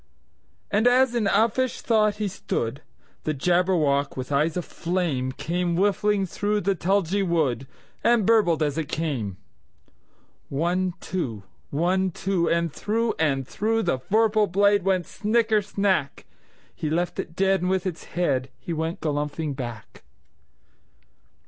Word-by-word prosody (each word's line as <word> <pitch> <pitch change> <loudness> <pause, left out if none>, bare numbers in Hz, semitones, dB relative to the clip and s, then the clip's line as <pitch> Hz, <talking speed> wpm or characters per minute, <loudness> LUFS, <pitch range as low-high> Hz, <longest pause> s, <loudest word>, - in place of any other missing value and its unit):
And 215 +4 +3
as 255 0 +4
in 235 -3 0
uffish 230 +5 +1
thought 215 -2 +2
he 210 0 -2
stood, 135 -8 -3 0.4
The 155 - -1
Jabberwock, 160 -4 +1
with 130 +2 -5
eyes 150 +4 +1
of 180 - -2
flame, 165 -7 -2
Came 170 +5 -2
whiffling 205 +1 +2
through 205 +3 -1
the 195 +1 +1
tulgey 195 +1 +1
wood, 150 - 0 0.4
And 235 -4 +4
burbled 185 -8 +3
as 145 +1 -1
it 155 - -3
came! 130 - -3 1.1
One, 175 +5 0
two! 125 - -3 0.3
One, 185 +5 +1
two! 185 -1 -1
And 170 -2 0
through 225 +2 0
and 135 -4 +1
throughThe 215 - 0
vorpal 215 -1 +3
blade 200 +2 +4
went 185 -2 +1
snicker 220 0 +1
snack! 195 -8 -1 0.5
He 155 - -3
left 175 +3 -1
it 165 - -5
dead, 195 0 +2
and 180 - 0
with 190 0 0
its 175 -3 -4
headHe 140 -1 -1
went 160 +2 -3
galumphing 150 0 -2
back. 120 -4 -7
180 Hz, 135 wpm, -25 LUFS, 150-205 Hz, 1.1 s, as